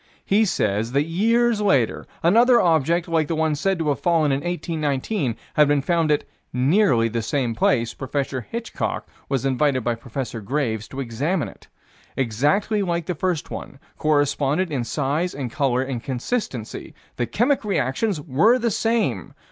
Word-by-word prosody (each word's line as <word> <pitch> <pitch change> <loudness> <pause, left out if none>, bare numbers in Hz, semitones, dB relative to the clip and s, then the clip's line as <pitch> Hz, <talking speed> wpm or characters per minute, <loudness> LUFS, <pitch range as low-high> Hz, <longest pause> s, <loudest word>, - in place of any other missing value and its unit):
He 210 +3 +3
says 110 - 0
that 140 +1 +3
years 225 +7 +2
later, 140 - +1 0.2
another 235 +8 +5
object, 165 0 +2
like 165 -3 +1
the 165 - -1
one 160 -1 +1
said 190 +6 0
to 160 -3 -1
have 145 - 0
fallen 165 -4 +2
in 135 - +1
1819, 155 - -2 0.2
had 150 -1 +5
been 145 -1 +2
found 165 0 +1
at 150 - +2 0.3
"nearly 130 - +3
the 115 +1 -2
same 120 +1 -1
place." 115 0 +1
Prof. 130 -1 -3
Hitchcock 235 0 -4 0.2
was 135 -2 -1
invited 135 -1 +1
by 120 - +1
Prof. 115 -1 -6
Graves 110 -3 -2
to 135 - -6
examine 140 +8 -1
it. - - -17 0.5
Exactly 145 - +1
like 170 -3 -1
the 180 - -2
first 175 -1 -2
one. - - -7 0.2
Corresponded 145 +3 +1
in 130 -5 -1
size 150 +7 -1
and 130 -4 -4
color 130 -2 +1
and 130 -3 -4
consistency. 130 - -4 0.2
The 120 - -1
chemic 245 - +1
reactions 190 - 0
were 165 - +3
the 235 -2 0
same. 210 - 0
145 Hz, 160 wpm, -23 LUFS, 130-180 Hz, 0.5 s, another